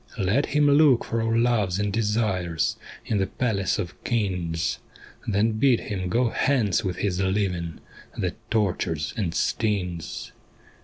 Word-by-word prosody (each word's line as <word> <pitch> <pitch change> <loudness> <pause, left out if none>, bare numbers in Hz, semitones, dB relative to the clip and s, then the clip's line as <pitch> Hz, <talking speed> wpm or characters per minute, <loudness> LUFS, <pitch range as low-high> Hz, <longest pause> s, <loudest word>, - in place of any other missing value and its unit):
' - - -18
Let 110 +7 +1
him 150 +1 +2
look 145 -3 +5
for 115 0 -1
our 115 0 +1
loves 115 -6 +2
and 105 -1 -1
desires 105 -6 0 0.3
In 110 -4 0
the 95 - +1
palace 105 -7 0
of 90 -5 -6
Kings, 90 -8 -1 0.5
Then 110 +2 +2
bid 130 -3 +4
him 95 -4 -4
go 120 +5 +2
hence 115 -7 +1
with 95 -3 -2
his 95 -3 -1
living 95 -4 -1 0.4
That - - -1 0.2
tortures 90 -7 0
and 95 -7 -2
stings. 90 -7 -2
105 Hz, 145 wpm, -25 LUFS, 90-115 Hz, 0.5 s, look